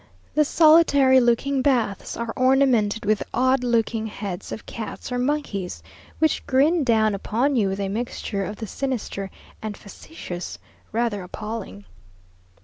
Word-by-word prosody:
The 300 Hz, -, +4 dB
solitary 285 Hz, -5 st, +6 dB
looking 255 Hz, +3 st, +2 dB
baths 240 Hz, -8 st, 0 dB
are 235 Hz, -1 st, -3 dB
ornamented 255 Hz, -5 st, +3 dB
with 215 Hz, 0 st, +2 dB
odd 260 Hz, 0 st, +2 dB
looking 230 Hz, -2 st, 0 dB
heads 200 Hz, -4 st, -6 dB
of -, -, -6 dB
cats 230 Hz, +3 st, -7 dB
or 250 Hz, -, -1 dB
monkeys, 250 Hz, -9 st, -2 dB, 0.3 s
which 315 Hz, -1 st, +1 dB
grin 295 Hz, +5 st, +3 dB
down 220 Hz, -4 st, +3 dB
upon 235 Hz, +8 st, 0 dB
you 215 Hz, -5 st, +2 dB
with 195 Hz, +1 st, -3 dB
a 200 Hz, -, -1 dB
mixture 210 Hz, -1 st, -3 dB
of 205 Hz, -, -5 dB
the 220 Hz, -, -6 dB
sinister 215 Hz, -4 st, -4 dB, 0.3 s
and 215 Hz, -2 st, -5 dB
facetious 195 Hz, -, -8 dB, 0.3 s
rather 225 Hz, -3 st, -1 dB
appalling. 190 Hz, -, -7 dB
230 Hz, 140 wpm, -23 LUFS, 205-265 Hz, 0.3 s, solitary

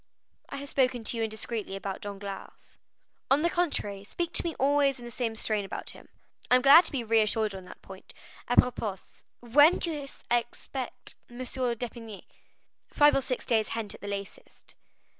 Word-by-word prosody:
"I -, -, -6 dB
have 280 Hz, 0 st, -7 dB
spoken 255 Hz, -3 st, +1 dB
to 230 Hz, -, 0 dB
you -, -, -1 dB
indiscreetly 220 Hz, -2 st, -3 dB
about 195 Hz, 0 st, -5 dB
Danglars." 200 Hz, -1 st, -7 dB, 0.8 s
"On 280 Hz, +3 st, +4 dB
the 340 Hz, -, +2 dB
contrary, 210 Hz, -, -1 dB
speak 345 Hz, +11 st, -4 dB
to -, -, +2 dB
me 335 Hz, -2 st, -3 dB
always 280 Hz, 0 st, +2 dB
in 240 Hz, -, -10 dB
the 240 Hz, -, -8 dB
same 230 Hz, -2 st, -2 dB
strain 215 Hz, -2 st, 0 dB
about 195 Hz, -, -5 dB
him." -, -, -15 dB, 0.4 s
"I 250 Hz, -, +6 dB
am 250 Hz, -, +3 dB
glad 285 Hz, +6 st, +9 dB
to -, -, -2 dB
be 265 Hz, -4 st, -2 dB
reassured 220 Hz, -1 st, +2 dB
on 190 Hz, -1 st, -8 dB
that -, -, -13 dB
point. 190 Hz, 0 st, -11 dB, 0.4 s
Apropos, 240 Hz, -5 st, +2 dB, 0.5 s
when 290 Hz, +8 st, +6 dB
do 335 Hz, -, -2 dB
you 290 Hz, -3 st, -5 dB, 0.2 s
aspect 240 Hz, +2 st, -3 dB, 0.2 s
M. 240 Hz, -, -12 dB
d'Épinay?" 240 Hz, -4 st, -4 dB, 0.6 s
"Five 295 Hz, 0 st, +5 dB
or 275 Hz, -, +2 dB
six 255 Hz, -1 st, -2 dB
days 220 Hz, -2 st, +2 dB
hence 225 Hz, -3 st, -4 dB
at -, -, -13 dB
the 205 Hz, -, -7 dB
latest." 200 Hz, -1 st, -8 dB
240 Hz, 180 wpm, -28 LUFS, 210-275 Hz, 0.8 s, glad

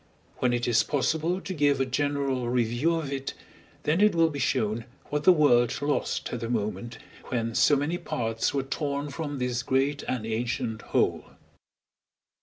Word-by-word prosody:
When 125 Hz, -, +1 dB
it 120 Hz, 0 st, 0 dB
is 120 Hz, -1 st, +4 dB
possible 160 Hz, +8 st, 0 dB
to 190 Hz, -, -5 dB
give 145 Hz, -4 st, +2 dB
a 135 Hz, -, +2 dB
general 135 Hz, -2 st, -1 dB
review 120 Hz, +7 st, +1 dB
of 150 Hz, -4 st, -3 dB
it, 135 Hz, 0 st, -4 dB, 0.5 s
then 160 Hz, +6 st, +2 dB
it 210 Hz, -3 st, +5 dB
will 165 Hz, -1 st, +4 dB
be 145 Hz, -, -5 dB
shown 115 Hz, -2 st, 0 dB, 0.3 s
what 150 Hz, 0 st, -1 dB
the 185 Hz, -, +9 dB
world 120 Hz, -8 st, +4 dB
lost 145 Hz, 0 st, -1 dB
at 120 Hz, -, -2 dB
the 115 Hz, 0 st, -4 dB
moment 110 Hz, 0 st, -3 dB, 0.3 s
when 115 Hz, -2 st, -2 dB
so 120 Hz, +5 st, +5 dB
many 150 Hz, +5 st, -1 dB
parts 115 Hz, -9 st, -1 dB
were 140 Hz, -1 st, -1 dB
torn 140 Hz, +1 st, -3 dB
from 145 Hz, -2 st, -4 dB
this 125 Hz, -1 st, -1 dB
great 135 Hz, +2 st, +1 dB
and 125 Hz, -4 st, -2 dB
ancient 115 Hz, 0 st, -2 dB
whole. -, -, 0 dB
135 Hz, 170 wpm, -27 LUFS, 120-145 Hz, 0.5 s, the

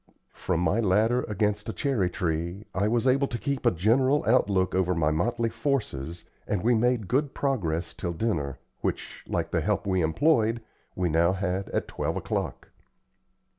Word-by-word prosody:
From 90 Hz, -2 st, -1 dB
my 100 Hz, +5 st, +2 dB
ladder 110 Hz, +4 st, +3 dB
against 105 Hz, +1 st, -1 dB
a -, -, -3 dB
cherry 125 Hz, -11 st, 0 dB
tree, 85 Hz, +1 st, -3 dB
I 100 Hz, +2 st, +1 dB
was 115 Hz, +2 st, +1 dB
able 135 Hz, +2 st, +3 dB
to 120 Hz, -, -3 dB
keep 140 Hz, +1 st, -1 dB
a -, -, +8 dB
general 130 Hz, -, +2 dB
outlook 100 Hz, -6 st, +2 dB
over 90 Hz, -1 st, +1 dB
my 80 Hz, -2 st, +2 dB
motley 115 Hz, +9 st, 0 dB
forces, 85 Hz, -, -2 dB, 0.2 s
and 100 Hz, -3 st, -1 dB
we 120 Hz, -, +4 dB
all 110 Hz, -, +3 dB
made 120 Hz, -3 st, +1 dB
good 135 Hz, +5 st, 0 dB
progress 90 Hz, -, -1 dB
till 85 Hz, -, -4 dB
dinner, 80 Hz, -, -1 dB, 0.2 s
which, -, -, -4 dB
like -, -, -2 dB
the -, -, +1 dB
help -, -, 0 dB
we 95 Hz, -2 st, +1 dB
employed, 115 Hz, -, +2 dB, 0.3 s
we 90 Hz, -1 st, 0 dB
now 85 Hz, +2 st, +3 dB
had 95 Hz, 0 st, -2 dB
at -, -, -2 dB
twelve -, -, -3 dB
o'clock. -, -, -3 dB
105 Hz, 170 wpm, -27 LUFS, 90-120 Hz, 0.3 s, a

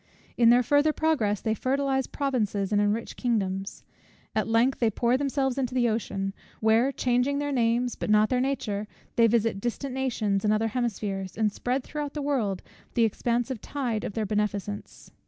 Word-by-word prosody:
In 235 Hz, -1 st, +5 dB
their 245 Hz, +1 st, +6 dB
further 290 Hz, +5 st, +3 dB
progress 235 Hz, -12 st, +1 dB
they 220 Hz, -, 0 dB
fertilize 265 Hz, +2 st, 0 dB
provinces 215 Hz, -8 st, -1 dB
and 205 Hz, -1 st, +3 dB
enrich 210 Hz, +3 st, -1 dB
kingdoms. 195 Hz, -5 st, -2 dB, 0.5 s
At 215 Hz, -, 0 dB
length 230 Hz, +4 st, +2 dB
they 230 Hz, -, +3 dB
pour 235 Hz, +3 st, +1 dB
themselves 270 Hz, -1 st, 0 dB
into 255 Hz, -1 st, -2 dB
the 245 Hz, -2 st, +3 dB
ocean; 195 Hz, -3 st, -2 dB, 0.3 s
where, 225 Hz, +4 st, +3 dB
changing 250 Hz, +2 st, +1 dB
their 290 Hz, 0 st, -1 dB
names 240 Hz, -1 st, +1 dB
but -, -, -4 dB
not 215 Hz, 0 st, +4 dB
their 250 Hz, -1 st, +1 dB
nature, 215 Hz, -6 st, -2 dB, 0.3 s
they 230 Hz, -1 st, +5 dB
visit 225 Hz, -3 st, +1 dB
distant 250 Hz, +3 st, -3 dB
nations 220 Hz, -7 st, 0 dB
and 210 Hz, -, +3 dB
other 220 Hz, +1 st, +1 dB
hemispheres, 205 Hz, -5 st, -3 dB
and 215 Hz, -2 st, +2 dB
spread 250 Hz, +5 st, -2 dB
throughout 295 Hz, +1 st, -5 dB
the 295 Hz, -, -2 dB
world 230 Hz, -10 st, -1 dB, 0.3 s
the 235 Hz, -, +4 dB
expansive 235 Hz, +2 st, -1 dB
tide 245 Hz, -7 st, -2 dB
of -, -, -4 dB
their 220 Hz, +1 st, -1 dB
beneficence. 205 Hz, 0 st, -3 dB
235 Hz, 175 wpm, -27 LUFS, 210-265 Hz, 0.5 s, their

